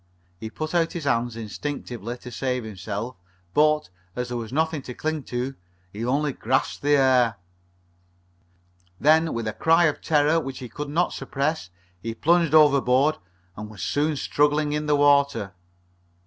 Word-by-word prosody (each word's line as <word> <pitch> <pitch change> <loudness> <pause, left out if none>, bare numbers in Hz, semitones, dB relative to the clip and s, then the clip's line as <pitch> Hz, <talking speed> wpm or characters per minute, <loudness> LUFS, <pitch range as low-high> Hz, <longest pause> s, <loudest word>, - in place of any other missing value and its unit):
He 110 - -6
put 155 +8 -5
out 165 -1 +1
his 170 - -5
hands, 120 -3 0
instinctively, 120 0 -5
to 125 - -10
save 125 -1 -2
himself, 105 +3 -5 0.4
but, 150 -3 +3 0.3
as 125 0 -3
there 120 - -3
was 115 -1 -6
nothing 160 +1 0
to 125 -2 -8
cling 155 -1 -2
to, 125 +2 -3 0.4
he 105 +3 -5
only 140 +4 0
grasped 130 +3 -1
the 145 +1 +3
air. 130 -4 +3 1.6
Then, 160 +2 +4
with 115 -1 -3
a 110 - -2
cry 165 +9 +3
of 150 - 0
terror 155 +1 +3
which 135 -4 -6
he 125 - -8
could 145 +5 -6
not 170 +4 +1
suppress, 140 - -2 0.3
he 115 +2 -5
plunged 165 +2 +3
overboard 140 -1 +4 0.4
and 105 +1 -7
was 105 -6 -8
soon 150 +1 0
struggling 145 +1 +1
in 150 0 -2
the 150 - +3
water. 140 -8 +3
140 Hz, 160 wpm, -24 LUFS, 120-150 Hz, 1.6 s, Then